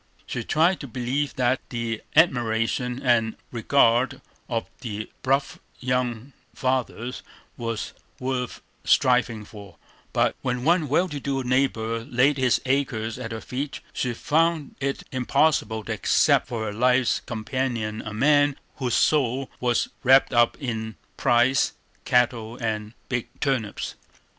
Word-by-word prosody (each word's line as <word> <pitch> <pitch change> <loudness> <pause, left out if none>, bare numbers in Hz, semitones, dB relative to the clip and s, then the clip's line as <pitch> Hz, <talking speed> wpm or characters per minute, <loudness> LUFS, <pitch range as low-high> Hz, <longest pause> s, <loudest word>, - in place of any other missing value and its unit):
She 120 - -4
tried 165 +8 +2
to 140 - -7
believe 130 +4 -2
that 130 0 +1
the 115 -2 -3
admiration 125 -4 +2
and 115 -3 +2 0.2
regard 120 +1 +3 0.3
of 115 -2 -2
the 110 -3 -5
bluff 135 +1 0 0.2
young 125 0 -2 0.2
farmers 130 -1 -2 0.3
was 115 -2 -4 0.3
worth 125 -1 -3 0.2
striving 125 -5 +3
for; 100 -2 -12 0.3
but - - +2
when 125 -1 -2
one 165 +1 +3
well 175 +6 +3
to 150 -4 -5
do 135 -1 -2
neighbor 115 -3 0
laid 135 +3 +2
his 125 -2 +3
acres 130 -4 -1
at 115 -3 -5
her 110 0 -5
feet, 135 +3 -4
she 125 -2 -2
found 160 +2 +1
it 140 0 -2
impossible 125 -4 +1
to 110 - -3
accept 105 - +3
for 115 -2 -3
her 105 - -3
life's 125 +2 +3
companion 115 -2 -2
a - - -7
man 145 +5 +3 0.2
whose 125 -4 0
soul 135 -3 +2
was 120 -1 +1
wrapped 130 +1 +5
up 120 0 +4
in 110 -4 -4 0.2
prize 125 +1 +3 0.3
cattle 120 -2 +1
and 110 -1 -3
big 125 -2 -2
turnips. 125 -7 -1
125 Hz, 135 wpm, -25 LUFS, 115-135 Hz, 0.3 s, wrapped